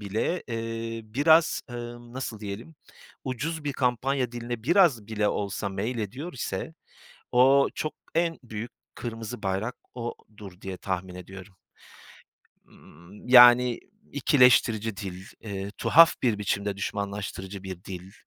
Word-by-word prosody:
bile, 110 Hz, -, -2 dB
eee, 115 Hz, 0 st, -4 dB
biraz, 155 Hz, +9 st, +3 dB
ımm, 120 Hz, 0 st, -8 dB
nasıl 120 Hz, -5 st, -5 dB
diyelim, 105 Hz, +9 st, -7 dB, 0.5 s
ucuz 150 Hz, +5 st, -3 dB
bir 145 Hz, -, -1 dB
kampanya 125 Hz, 0 st, 0 dB
diline 120 Hz, -1 st, -5 dB
biraz 160 Hz, -, +4 dB
bile 105 Hz, -1 st, 0 dB
olsa 100 Hz, 0 st, -2 dB
meylediyor 115 Hz, -, -4 dB
ise 160 Hz, -, -4 dB, 0.6 s
o 135 Hz, +3 st, +5 dB
çok 155 Hz, -, -3 dB, 0.2 s
en 165 Hz, 0 st, +1 dB
büyük 115 Hz, +1 st, -6 dB, 0.2 s
kırmızı 115 Hz, 0 st, -6 dB
bayrak 100 Hz, +5 st, -2 dB, 0.2 s
odur 105 Hz, -5 st, -8 dB
diye 95 Hz, -2 st, -6 dB
tahmin 90 Hz, -1 st, -4 dB
ediyorum. 95 Hz, +2 st, -11 dB, 1.1 s
Imm, 85 Hz, +9 st, -16 dB
yani, 125 Hz, -1 st, +8 dB, 0.3 s
ikileştirici 125 Hz, -6 st, +4 dB
dil, 95 Hz, -1 st, -7 dB, 0.2 s
eee, 100 Hz, -2 st, -5 dB
tuhaf 165 Hz, +2 st, +7 dB
bir 115 Hz, -5 st, +2 dB
biçimde 100 Hz, 0 st, -1 dB
düşmanlaştırıcı 100 Hz, -1 st, -4 dB
bir 95 Hz, -1 st, -8 dB
dil, 95 Hz, +1 st, -8 dB
115 Hz, 120 wpm, -27 LUFS, 100-125 Hz, 1.1 s, yani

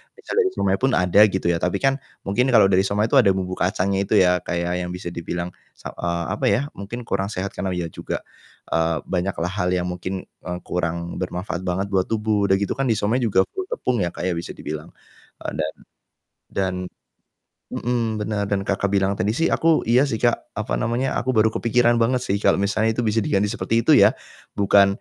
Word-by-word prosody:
misal -, -, -8 dB
dari 390 Hz, -4 st, +3 dB
siomay 95 Hz, -, +1 dB
pun 135 Hz, 0 st, +2 dB
ada 90 Hz, +1 st, +3 dB
gitu 95 Hz, -3 st, 0 dB
ya, 85 Hz, -, +1 dB
tapi 90 Hz, +3 st, 0 dB
kan 135 Hz, 0 st, +2 dB, 0.2 s
mungkin 125 Hz, +7 st, +1 dB
kalau 110 Hz, -6 st, +5 dB
dari 95 Hz, -, +4 dB
siomay 105 Hz, +3 st, 0 dB
itu 140 Hz, -, +6 dB
ada 115 Hz, -6 st, +5 dB
bumbu 95 Hz, -1 st, -3 dB
kacangnya 95 Hz, +1 st, +1 dB
itu -, -, -1 dB
ya 90 Hz, 0 st, +3 dB
kayak 85 Hz, 0 st, -1 dB, 0.2 s
yang -, -, -6 dB
bisa 90 Hz, -1 st, -6 dB
dibilang 85 Hz, +1 st, -4 dB, 0.2 s
se -, -, -9 dB
eee, 85 Hz, 0 st, -2 dB
apa -, -, -2 dB
ya, 100 Hz, +3 st, +3 dB, 0.2 s
mungkin 115 Hz, +5 st, -6 dB
kurang 100 Hz, -3 st, -1 dB
sehat 95 Hz, +2 st, -3 dB
karena 95 Hz, -2 st, -3 dB
iya 85 Hz, -2 st, -3 dB
juga, -, -, -5 dB, 0.6 s
eee, 80 Hz, 0 st, +1 dB
banyak 95 Hz, +1 st, -2 dB
lah 90 Hz, -, -1 dB
hal 95 Hz, -2 st, -1 dB
yang 90 Hz, -, 0 dB
mungkin, 90 Hz, +2 st, -4 dB, 0.2 s
eee, 90 Hz, 0 st, -3 dB
kurang 85 Hz, -1 st, -3 dB
bermanfaat 90 Hz, 0 st, -3 dB
banget 95 Hz, +3 st, -1 dB
buat 95 Hz, -2 st, +1 dB
tubuh. 105 Hz, -2 st, +1 dB
Udah 95 Hz, -, +4 dB
gitu 100 Hz, +1 st, -1 dB
kan 135 Hz, 0 st, -1 dB
di 115 Hz, -, +2 dB
siomay 110 Hz, +4 st, +1 dB
juga 100 Hz, -6 st, +3 dB
full 380 Hz, -1 st, -5 dB
tepung 380 Hz, -, -1 dB
ya 90 Hz, -, +1 dB
kayak 90 Hz, +2 st, -1 dB
bisa 85 Hz, -, -7 dB
dibilang, 75 Hz, +2 st, -7 dB, 0.5 s
eee, -, -, -3 dB
dan -, -, -1 dB, 0.8 s
dan 95 Hz, -1 st, -1 dB, 1.0 s
mhm, 115 Hz, -3 st, -1 dB
bener 105 Hz, -1 st, -1 dB
dan, 100 Hz, -1 st, 0 dB
Kakak, 100 Hz, 0 st, +1 dB
bilang 100 Hz, -1 st, +2 dB
tadi 105 Hz, -, +1 dB
sih 165 Hz, +6 st, +1 dB
aku 165 Hz, -, +1 dB, 0.2 s
iya 125 Hz, +4 st, +5 dB
sih, 110 Hz, -, -2 dB
Kak, 120 Hz, -1 st, +3 dB, 0.2 s
apa 110 Hz, -, -3 dB
namanya 120 Hz, +3 st, 0 dB
aku 125 Hz, -, 0 dB
baru 110 Hz, +1 st, +5 dB
kepikiran 120 Hz, +1 st, +3 dB
banget 125 Hz, +2 st, +2 dB
sih 100 Hz, -, +1 dB
kalau -, -, +5 dB
misalnya 110 Hz, +3 st, +1 dB
itu 120 Hz, -, -1 dB
bisa 110 Hz, +1 st, +1 dB
diganti 100 Hz, +1 st, +1 dB
seperti 115 Hz, 0 st, -2 dB
itu -, -, +4 dB
ya, -, -, +8 dB, 0.5 s
bukan 100 Hz, 0 st, +5 dB
100 Hz, 210 wpm, -22 LUFS, 90-115 Hz, 1.0 s, ya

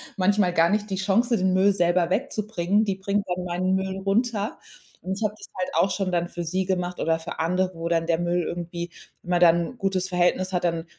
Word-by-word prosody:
manchmal 195 Hz, -2 st, +2 dB
gar 165 Hz, 0 st, +4 dB
nicht 210 Hz, +1 st, 0 dB
die 195 Hz, -, -1 dB
Chance, 215 Hz, +6 st, +2 dB
den 190 Hz, -3 st, +1 dB
Müll 195 Hz, +2 st, +4 dB
selber 175 Hz, -2 st, +2 dB
wegzubringen. 210 Hz, -3 st, 0 dB
Die 195 Hz, -2 st, -1 dB
bringt 200 Hz, +1 st, -1 dB
dann 180 Hz, 0 st, -2 dB
meinen 180 Hz, +1 st, 0 dB
Müll 190 Hz, 0 st, -2 dB
runter. 210 Hz, +2 st, 0 dB, 0.4 s
Und 185 Hz, -, -5 dB
ich -, -, -3 dB
habe 210 Hz, -, -1 dB
das -, -, -12 dB
halt 185 Hz, -, -2 dB
auch 195 Hz, -, +3 dB
schon 195 Hz, -2 st, -1 dB
dann 175 Hz, 0 st, 0 dB
für 175 Hz, -, -5 dB
sie 185 Hz, +3 st, 0 dB
gemacht 180 Hz, -1 st, -2 dB
oder 165 Hz, 0 st, +1 dB
für 165 Hz, +1 st, -7 dB
andere, 180 Hz, +3 st, +1 dB
wo 165 Hz, 0 st, -4 dB
dann 165 Hz, -1 st, +1 dB
der 165 Hz, -1 st, +2 dB
Müll 175 Hz, 0 st, 0 dB
irgendwie 170 Hz, 0 st, -5 dB, 0.3 s
wenn 175 Hz, -, -11 dB
man 175 Hz, 0 st, +2 dB
dann 170 Hz, -1 st, +7 dB, 0.2 s
'n -, -, -20 dB
gutes 190 Hz, -3 st, -1 dB
Verhältnis 185 Hz, +1 st, +1 dB
hat, 180 Hz, -, 0 dB
dann 165 Hz, -1 st, -1 dB
185 Hz, 230 wpm, -25 LUFS, 175-195 Hz, 0.4 s, dann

